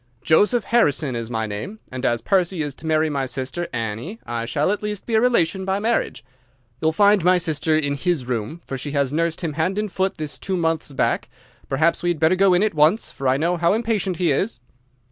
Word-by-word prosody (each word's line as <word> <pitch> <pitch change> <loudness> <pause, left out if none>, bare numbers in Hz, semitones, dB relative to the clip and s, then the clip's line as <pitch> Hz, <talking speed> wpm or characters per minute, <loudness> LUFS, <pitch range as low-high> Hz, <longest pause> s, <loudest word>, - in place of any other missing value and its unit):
Joseph 205 - +3
Harrison 150 - +1
is 115 -1 -4
my 110 -2 -2
name, 110 - -6
and 130 0 -6
as 120 -1 0
Percy 180 -2 +1
is 145 -2 -4
to 160 - -9
marry 155 0 +2
my 140 -3 -2
sister 135 +7 -3
Annie 115 - -4
I 115 -1 -3
shall 145 +9 +1
at 205 - -2
least 210 -2 -4
be 235 - -4
a 220 - +4
relation 190 -7 +2
by 190 +1 0
marriage. 225 - -1 0.6
You 160 - +1
will - - +4
find 205 +2 +4
my 180 +1 +5
sister 160 -2 +1
in 145 -2 0
his 150 -2 -1
room, 125 +7 -4
for 135 - -5
she 145 +2 -5
has 140 -1 0
nursed 165 +1 -1
him 165 -4 -2
hand 165 +6 -1
and 210 -2 -2
foot 190 +1 -1
this 155 -2 -5
two 190 -1 -2
months 165 -3 -1
back. 135 - 0 0.4
Perhaps 155 +5 +2
we'd 175 -2 0
better 160 +3 +4
go 190 -1 +4
in 180 - +3
at 215 - +1
once, 155 +8 +3
for 135 -1 -4
I 130 +1 +3
know 170 +4 0
how 170 +2 +2
impatient 215 -5 -1
he 175 -4 +2
is." 190 - -1
165 Hz, 225 wpm, -22 LUFS, 140-190 Hz, 0.6 s, my